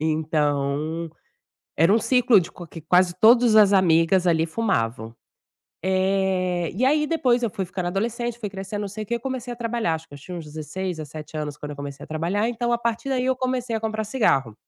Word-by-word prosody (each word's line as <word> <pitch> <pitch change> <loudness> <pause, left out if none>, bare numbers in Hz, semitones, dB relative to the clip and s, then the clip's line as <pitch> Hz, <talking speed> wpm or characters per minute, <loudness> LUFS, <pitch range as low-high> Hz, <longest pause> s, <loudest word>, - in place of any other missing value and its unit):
Então, 155 0 -1 0.7
era 165 +5 +4
um 225 - +4
ciclo 250 -2 +4
de 170 - -5
qua 175 - -10
que 165 - -10
quase 180 +3 +3
todas 235 0 +6
as 205 -2 +6
amigas 180 0 +4
ali 165 -2 +3
fumavam. 115 - -2 0.7
Eh, 185 -2 0
e 235 +7 0
aí 300 +3 +3
depois 255 -7 +1
eu 235 - +1
fui 195 - -3
ficando 180 0 -4
adolescente, 235 +5 -2
fui 210 -4 -5
crescendo 195 +2 -5
não 205 - -4
sei 215 +2 -6
o - - -17
que, 235 - -2
eu 235 - -3
comecei 255 -1 -4
a - - -8
trabalhar 230 -7 -1
acho 160 0 -6
que - - -20
eu - - -9
tinha 180 +6 -8
uns 165 - -6
16, 160 +4 -5
17 155 0 -8
anos 150 -1 -4
quando 150 0 -7
eu 145 - -7
comecei 140 0 -7
a - - -14
trabalhar 170 +7 -1
então 240 0 -2
a - - +3
partir 235 +2 -2
daí 255 -2 0
eu 260 0 +2
comecei 255 -2 -2
a - - -3
comprar 220 0 -2
cigarro. 170 - +1
190 Hz, 215 wpm, -23 LUFS, 160-230 Hz, 0.7 s, todas